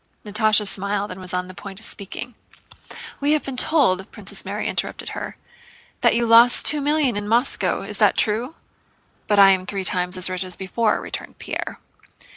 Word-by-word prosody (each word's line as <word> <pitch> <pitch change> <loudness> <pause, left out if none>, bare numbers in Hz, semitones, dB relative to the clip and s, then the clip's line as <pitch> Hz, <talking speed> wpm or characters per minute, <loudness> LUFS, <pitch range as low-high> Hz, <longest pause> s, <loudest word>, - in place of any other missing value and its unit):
Natásha 210 0 +3
smiled 200 +1 -1
and 190 - -8
was 180 -1 -2
on 180 0 -2
the 185 - -10
point 195 +1 -10
of 225 - -8
speaking. 210 +4 -7 0.9
"We 290 +1 +2
have 305 - +1
been 270 - -5
told," 245 - +2
Princess - - -8
Mary - - -3
interrupted - - -3
her, - - -6 0.6
"that - - +4
you 235 0 +2
lost 235 +2 +6
two 300 0 +3
millions 290 -6 +1
in 205 - -6
Moscow. 235 +5 +1
Is - - -5
that - - +4
true?" 235 +8 0 0.7
"But 205 - +2
I 195 -1 +8
am 185 -1 0
three 195 -2 -3
times 180 0 -1
as 185 - +1
rich 185 0 -2
as 185 -2 -8
before," 210 +3 0
returned - - -7
Pierre. - - -5
205 Hz, 185 wpm, -22 LUFS, 190-240 Hz, 0.9 s, I